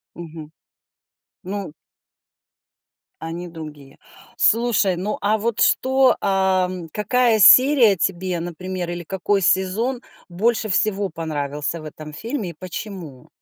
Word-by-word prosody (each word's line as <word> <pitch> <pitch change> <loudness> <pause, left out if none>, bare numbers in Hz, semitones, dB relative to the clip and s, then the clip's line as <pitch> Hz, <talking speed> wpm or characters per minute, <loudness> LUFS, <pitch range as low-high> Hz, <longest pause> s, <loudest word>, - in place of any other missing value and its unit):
Мгм. 160 -2 -9 0.9
Ну. 190 -4 -5 1.5
Они 170 +2 -6
другие. 150 -4 -11 0.4
Слушай, 225 -5 +2
ну 195 +4 -3
а 210 +2 +2
вот 225 +1 -2
что, 265 0 +3
а, 190 -1 +2
м, 180 -3 -7
какая 230 +4 +2
серия 250 0 +7
тебе, 180 0 -2
например, 175 +1 -5
или 175 0 -5
какой 195 +3 -1
сезон 205 +8 +1 0.3
больше 220 +5 0
всего 200 0 0
понравился 155 -1 -4
в - - -12
этом 155 0 -9
фильме 225 - -4
и - - -11
почему? 185 -6 -8
185 Hz, 115 wpm, -21 LUFS, 165-215 Hz, 1.5 s, серия